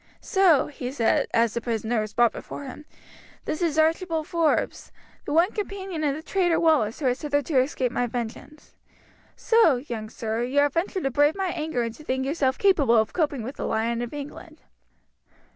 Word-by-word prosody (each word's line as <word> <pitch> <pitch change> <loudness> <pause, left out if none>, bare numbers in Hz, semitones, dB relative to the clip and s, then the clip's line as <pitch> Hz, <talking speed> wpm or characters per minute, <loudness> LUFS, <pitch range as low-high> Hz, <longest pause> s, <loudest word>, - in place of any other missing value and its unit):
"So," 370 -7 +3
he 255 -3 -6
said 235 -5 +1
as 230 -1 +2
the 235 - -2
prisoner 225 0 -1
was 215 -1 -6
brought 240 -1 +4
before - - -8
him, 280 +2 -9 0.6
"this 310 - -3
is 325 -3 0
Archibald 320 0 +1
Forbes, 335 -4 0 0.3
the - - -4
one 335 +6 +3
companion 385 -5 -5
of 285 -2 +1
the 310 - -8
traitor 350 -3 +1
Wallace 310 -8 +2
who - - -2
has 250 0 +1
hitherto 290 -1 +1
escaped 255 -2 -1
my 245 - 0
vengeance. 245 +6 -7 0.6
So, 450 - +4
young 235 -4 -6
sir, 225 +1 -3
you 255 +4 -2
have 285 -1 +4
ventured 365 +2 -1
to 270 - 0
brave 290 +4 +3
my 385 -2 -1
anger 310 -7 -2
and 230 -1 -4
to 305 - -14
think 260 -2 -2
yourself 270 -2 0
capable 300 - +3
of 220 -1 +1
coping 295 -8 -1
with 260 +5 -7
the - - -3
Lion 230 +2 -1
of 240 - -4
England." 295 +2 -9
285 Hz, 190 wpm, -25 LUFS, 240-320 Hz, 0.6 s, brought